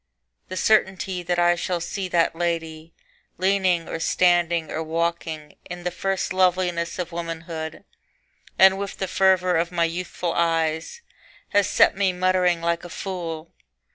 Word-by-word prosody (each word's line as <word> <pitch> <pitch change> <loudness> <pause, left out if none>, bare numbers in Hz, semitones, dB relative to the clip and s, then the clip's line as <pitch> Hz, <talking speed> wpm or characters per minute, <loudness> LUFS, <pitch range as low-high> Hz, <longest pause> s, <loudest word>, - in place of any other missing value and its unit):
The 185 - -6
certainty 190 -3 +1
that 175 0 -1
I 175 0 +4
shall 175 +1 -2
see 185 +3 -4
that 170 -2 +1
lady 165 -1 -3 0.5
Leaning 185 -2 +1
or 165 - -4
standing 170 -2 +2
or 160 - -2
walking 160 -1 -3 0.2
In 175 0 -7
the 180 - -1
first 190 +1 -2
loveliness 180 -2 +1
of 180 -1 -4
womanhood, 165 -1 -6 0.7
And 190 0 +6
with 200 -1 -5
the 190 - -2
fervour 185 -2 +3
of 170 +1 0
my 170 -1 +2
youthful 175 0 -3
eyes, 165 - 0 0.5
Has 205 -1 +3
set - - +4
me 190 -1 +1
muttering 180 -1 +2
like 170 0 -1
a 175 - -8
fool. 170 -3 -6
175 Hz, 145 wpm, -23 LUFS, 165-185 Hz, 0.7 s, And